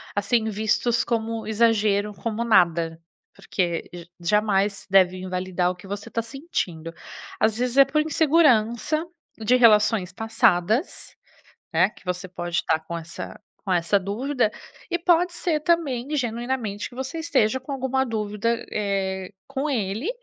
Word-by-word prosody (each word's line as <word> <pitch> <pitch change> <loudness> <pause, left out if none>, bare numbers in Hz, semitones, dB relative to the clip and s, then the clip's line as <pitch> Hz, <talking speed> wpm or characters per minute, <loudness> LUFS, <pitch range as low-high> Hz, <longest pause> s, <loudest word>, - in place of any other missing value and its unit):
assim, 220 +3 +1
vistos 220 +3 +1
como 225 -1 -2
exagero, 210 -2 +2
como 220 +4 -3
nada, 170 -6 +2 0.3
porque 175 -4 -2
j 170 -1 -10
jamais 200 +1 +1
deve 185 -1 +4
invalidar 185 -1 -1
o - - -8
que 180 +2 -14
você 200 +1 -6
tá 230 - -1
sentindo. 220 - -4 0.5
Às 220 0 +2
vezes 250 +1 -1
é 275 - +9
por 295 +3 +1
insegurança 305 -3 +2 0.3
de 225 +3 +3
relações 215 -5 +4
passadas, 225 - +1 0.6
né, 185 - +4
que - - -20
você 180 +1 -3
pode 175 -1 -2
tá 160 - +3
com 160 +2 -7
essa 165 +1 -8 0.2
com 195 - -1
essa 175 +3 +2
dúvida, 235 +5 -1 0.4
e 345 - 0
pode 350 0 +3
ser 325 -3 0
também 295 -7 0
genuinamente 235 -4 -2
que - - -16
você 265 +5 -5
esteja 260 -7 +1
com 260 - -11
alguma 265 0 0
dúvida, 220 +1 -2
eh, 190 -2 -2 0.2
com 275 +2 -3
ele, 220 - -1
215 Hz, 140 wpm, -24 LUFS, 190-255 Hz, 0.6 s, é